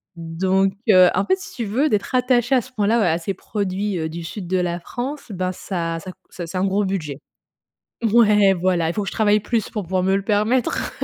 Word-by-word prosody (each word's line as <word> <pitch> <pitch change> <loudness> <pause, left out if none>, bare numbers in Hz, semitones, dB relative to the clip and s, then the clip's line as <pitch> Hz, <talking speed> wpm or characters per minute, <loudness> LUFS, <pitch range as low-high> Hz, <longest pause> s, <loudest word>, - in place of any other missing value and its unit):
Donc, 185 +4 0 0.2
heu, 185 -2 +7
en 190 - +1
fait, 375 - +2
si - - -10
tu 235 - -3
veux, 260 +9 +1
d'être 210 +3 -1
attaché 250 0 +2
à 250 - +3
ce 255 - -14
point-là, 215 +2 +2
à 165 - +1
ces 195 +4 -3
produits 195 -4 -3
du 170 +1 -6
sud 180 +2 -7
de 185 +2 0
la 175 -1 -1
France, 255 - -6
ben, 185 -1 -2
ça 165 -3 -3
ça 185 +3 -8
cou - - -42
c'est 175 -2 -7
c'est 170 - -5
un 190 - +1
gros 195 +1 +1
budget. 155 -7 -3 1.0
Ouais, 210 -4 +5
voilà, 175 -2 +1
il - - -4
faut 210 - -1
que 195 - -4
je - - -5
travaille 210 -1 +3
plus 225 0 -2
pour 210 -3 -4
pouvoir 185 +1 -1
me 190 +1 +2
le 195 - -2
permettre. 215 +4 0
195 Hz, 230 wpm, -21 LUFS, 180-215 Hz, 1.0 s, heu